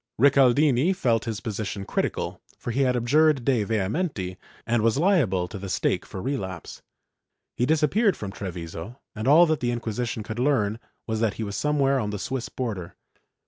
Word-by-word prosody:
Rical 135 Hz, -1 st, +6 dB
dini 150 Hz, +4 st, +3 dB
felt 115 Hz, -, +1 dB
his 110 Hz, -3 st, -4 dB
position 105 Hz, -3 st, -4 dB
critical, -, -, -2 dB, 0.2 s
for 120 Hz, -, -5 dB
he 130 Hz, +4 st, 0 dB
had 130 Hz, -2 st, +2 dB
abjured 140 Hz, +2 st, +3 dB
de 125 Hz, -6 st, +2 dB
vehemenii 100 Hz, -, -2 dB, 0.3 s
and 120 Hz, -1 st, +1 dB
was 115 Hz, +3 st, +2 dB
liable 140 Hz, -, +2 dB
to 100 Hz, -, -8 dB
the 100 Hz, 0 st, -6 dB
stake -, -, 0 dB
for 95 Hz, -, -7 dB
relapse. 95 Hz, -, -4 dB, 0.7 s
He 125 Hz, -, 0 dB
disappeared 160 Hz, +8 st, +2 dB
from 100 Hz, -2 st, -5 dB
Treviso 90 Hz, +4 st, -7 dB
and 110 Hz, +3 st, -4 dB
all 160 Hz, +5 st, +7 dB
that 155 Hz, -3 st, 0 dB
the 120 Hz, -, -1 dB
Inquisition 115 Hz, -1 st, -3 dB
could 110 Hz, +2 st, -6 dB
learn 115 Hz, -6 st, +1 dB, 0.3 s
was 110 Hz, -1 st, -2 dB
that 110 Hz, -3 st, +1 dB
he 115 Hz, -, -4 dB
was 100 Hz, -1 st, -4 dB
somewhere 140 Hz, -2 st, +2 dB
on 105 Hz, -4 st, -2 dB
the 105 Hz, -, -3 dB
Swiss 125 Hz, +4 st, -4 dB
border. 105 Hz, -9 st, -5 dB
120 Hz, 180 wpm, -25 LUFS, 105-140 Hz, 0.7 s, all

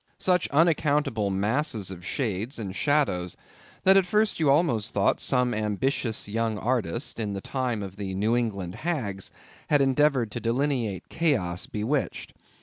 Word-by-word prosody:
Such 180 Hz, -2 st, +2 dB
unaccountable 145 Hz, -8 st, +2 dB
masses 105 Hz, +1 st, -1 dB
of 90 Hz, -2 st, -9 dB
shades 115 Hz, +3 st, -2 dB
and 100 Hz, -4 st, -5 dB
shadows, 135 Hz, -, +1 dB, 0.5 s
that 190 Hz, +1 st, +6 dB
at 190 Hz, -2 st, +3 dB
first 210 Hz, +1 st, +1 dB
you 155 Hz, -3 st, +3 dB
almost 135 Hz, -8 st, +2 dB
thought 100 Hz, -1 st, +2 dB
some 125 Hz, -2 st, +2 dB
ambitious 110 Hz, +2 st, -1 dB
young 110 Hz, +1 st, -1 dB
artist, 115 Hz, -, -2 dB
in 105 Hz, -3 st, -2 dB
the 100 Hz, -, -3 dB
time 125 Hz, -1 st, -2 dB
of 95 Hz, 0 st, -8 dB
the 95 Hz, -2 st, -4 dB
New 110 Hz, +5 st, +1 dB
England 100 Hz, -7 st, -2 dB
hags, 115 Hz, -, -2 dB, 0.4 s
had 145 Hz, -, +5 dB
endeavored 135 Hz, -4 st, +2 dB
to 120 Hz, -, -4 dB
delineate 120 Hz, -4 st, -1 dB
chaos 95 Hz, -, 0 dB
bewitched. 120 Hz, +7 st, -2 dB
115 Hz, 145 wpm, -26 LUFS, 100-145 Hz, 0.5 s, that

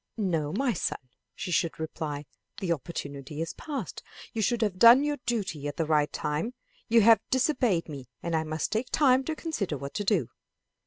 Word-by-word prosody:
"No, 165 Hz, -8 st, 0 dB
my 245 Hz, -, +1 dB
son," -, -, -1 dB, 0.4 s
she 185 Hz, -, -5 dB
should 170 Hz, -1 st, 0 dB
reply, 150 Hz, -2 st, -4 dB, 0.3 s
"the 185 Hz, -3 st, -1 dB
opportunity 145 Hz, -2 st, -6 dB
is 165 Hz, +1 st, -3 dB
past. 275 Hz, -, -5 dB, 0.3 s
You 225 Hz, -, -1 dB
should 235 Hz, +2 st, +1 dB
have 190 Hz, -4 st, -1 dB
done 235 Hz, +5 st, +9 dB
your 295 Hz, 0 st, 0 dB
duty 190 Hz, -11 st, -1 dB
at 145 Hz, -, -5 dB
the 165 Hz, -, +1 dB
right 150 Hz, -1 st, +2 dB
time. 160 Hz, +12 st, -2 dB, 0.3 s
You 230 Hz, 0 st, +5 dB
have 225 Hz, +1 st, +7 dB
disobeyed 255 Hz, -, +2 dB
me, 140 Hz, -5 st, -8 dB
and 170 Hz, -1 st, -1 dB
I 160 Hz, -, +1 dB
must 155 Hz, 0 st, -2 dB
take 220 Hz, +4 st, -1 dB
time 265 Hz, -3 st, +4 dB
to 320 Hz, -, -2 dB
consider 215 Hz, -, -3 dB
what 140 Hz, +1 st, -7 dB
to 205 Hz, -, -2 dB
do." 195 Hz, -, +1 dB
185 Hz, 190 wpm, -28 LUFS, 155-235 Hz, 0.4 s, done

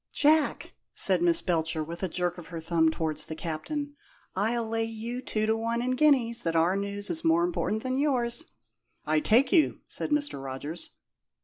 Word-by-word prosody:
"Jack," 305 Hz, 0 st, +2 dB, 0.2 s
said 185 Hz, -3 st, +3 dB
Miss 170 Hz, -1 st, +4 dB
Belcher, 160 Hz, -2 st, 0 dB
with 170 Hz, +2 st, -7 dB
a 190 Hz, -, 0 dB
jerk 175 Hz, +1 st, -2 dB
of 170 Hz, -, -10 dB
her 165 Hz, -1 st, -6 dB
thumb 160 Hz, 0 st, +2 dB
towards 155 Hz, -1 st, -1 dB
the 160 Hz, -, -5 dB
Captain, 285 Hz, -, -4 dB, 0.4 s
"I'll 225 Hz, +4 st, 0 dB
lay 225 Hz, 0 st, 0 dB
you 225 Hz, +2 st, -5 dB
two 215 Hz, -4 st, -1 dB
to 220 Hz, +1 st, +2 dB
one 230 Hz, +1 st, -1 dB
in 250 Hz, +1 st, -1 dB
guineas, 255 Hz, -4 st, +3 dB
that 165 Hz, -1 st, -1 dB
our 165 Hz, +3 st, +3 dB
news 200 Hz, 0 st, -3 dB
is 330 Hz, -1 st, -3 dB
more 330 Hz, +1 st, +3 dB
important 220 Hz, -11 st, -2 dB
than 260 Hz, +1 st, -1 dB
yours!" 255 Hz, -1 st, 0 dB, 0.6 s
"I 155 Hz, 0 st, +2 dB
take 230 Hz, -, +3 dB
you," 325 Hz, -4 st, +3 dB
said -, -, -3 dB
Mr. 290 Hz, -, -1 dB
Rogers. 140 Hz, +5 st, -6 dB
215 Hz, 185 wpm, -28 LUFS, 165-255 Hz, 0.6 s, Miss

